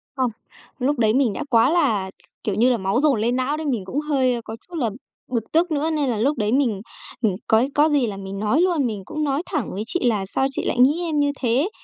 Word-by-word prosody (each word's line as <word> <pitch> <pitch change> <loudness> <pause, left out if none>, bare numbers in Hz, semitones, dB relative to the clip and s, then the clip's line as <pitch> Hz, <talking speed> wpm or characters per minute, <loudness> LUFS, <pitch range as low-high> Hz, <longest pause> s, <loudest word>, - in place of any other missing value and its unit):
Không, 255 -3 0 0.5
lúc 270 +1 0
đấy 220 -2 +3
mình 255 -4 +2
đã - - -4
quá 230 0 +4
là, 235 - +1
k - - -47 0.3
kiểu 205 -3 -1
như 240 +4 +4
là, 245 - +2
máu 195 +5 0
dồn 290 -7 +3
lên 240 +3 +1
não 260 +4 0
đấy, 315 - -5
mình 240 -9 -1
cũng 265 +10 -2
hơi 265 -5 +1
có 220 0 -7
chút 355 - -10
là 255 -8 0 0.4
bực 230 -3 -3
tức 335 +2 +2
nữa, 305 +1 0
nên 300 -4 0
là 230 - -1
lúc 275 +5 +1
đấy 210 -1 0
mình 240 -7 +1 0.4
mình 215 -6 +1
cói 225 +5 +3
có 300 +2 +4
gì 285 -5 +2
là 200 -2 -5
mình 195 0 -6
nói 215 +10 +2
luôn, 345 -7 +2
mình 215 -4 -3
cũng 305 0 -3
nói 285 +3 0
thẳng 300 - -3
với 200 +3 -3
chị 355 - -1
là 210 -5 +1
"Sao 265 +7 0
chị - - -4
lại 245 - -1
nghĩ 285 +7 +4
em 315 -3 -1
như 285 0 +2
thế? 255 - +1
255 Hz, 265 wpm, -22 LUFS, 220-295 Hz, 0.5 s, quá